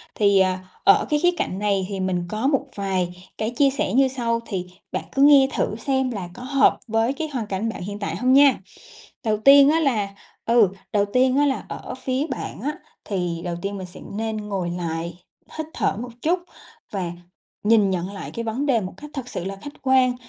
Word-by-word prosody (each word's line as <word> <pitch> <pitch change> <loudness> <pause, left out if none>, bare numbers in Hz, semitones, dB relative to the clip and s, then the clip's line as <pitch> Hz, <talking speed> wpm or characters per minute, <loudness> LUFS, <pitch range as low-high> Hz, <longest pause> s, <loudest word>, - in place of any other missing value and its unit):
Thì, 200 -2 +4
à, 185 -1 +2 0.2
ở 400 +1 +5
cái 300 - +2
khía 355 +3 +4
cạnh 185 - -2
này 200 -2 +1
thì 195 -2 -4
mình 185 -2 0
có 220 +5 -1
một 275 -2 +1
vài 190 -3 -1 0.3
cái 220 +1 -1
chia 275 +3 +3
sẻ 265 -7 -1
như 270 +1 +5
sau, 235 -3 -1
thì 185 -5 -4 0.2
bạn - - -2
cứ 270 - +2
nghe 280 -2 +7
thử - - 0
xem 265 +2 0
là 185 -5 -5
có 245 - -10
hợp 275 +1 +3
với 225 +3 +1
cái 315 +2 -4
hoàn 230 -5 -2
cảnh 200 +3 -2
bạn 220 - -6
hiện 205 +3 -5
tại 200 - -3
hông 255 +1 +2
nha. 275 -2 +6 0.6
Đầu 215 -2 +1
tiên 275 +5 +7
á 320 +2 +3
là 230 -10 +1 0.4
ừ, 230 -4 +5 0.2
đầu 205 -1 +3
tiên 255 +1 +3
á 290 - +4
là 270 -2 -1
ở - - -6
phía 260 +3 -2
bạn 260 - -5
á, 290 - -1 0.3
thì 175 -4 -2
đầu 175 -1 -3
tiên 200 0 -3
mình 185 -1 -6
sẽ 180 - -11 0.2
nên 220 0 -2
ngồi 195 -4 -3
lại, 170 0 -4 0.4
hít 315 -1 -3
thở 195 - 0
một 245 - -6
chút 350 +3 +2 0.5
và 185 -4 -2 0.5
nhìn 210 -2 +4
nhận 185 +1 -2
lại 200 - -7
cái 230 - -5
vấn 235 +6 -2
đề 245 -6 +2
một 185 - -6
cách 295 - -10
thật 270 -4 -5
sự 175 - -4
là 195 +1 -4
khách 290 +9 -11
quan. 260 -2 +4
225 Hz, 220 wpm, -23 LUFS, 195-270 Hz, 0.6 s, nghe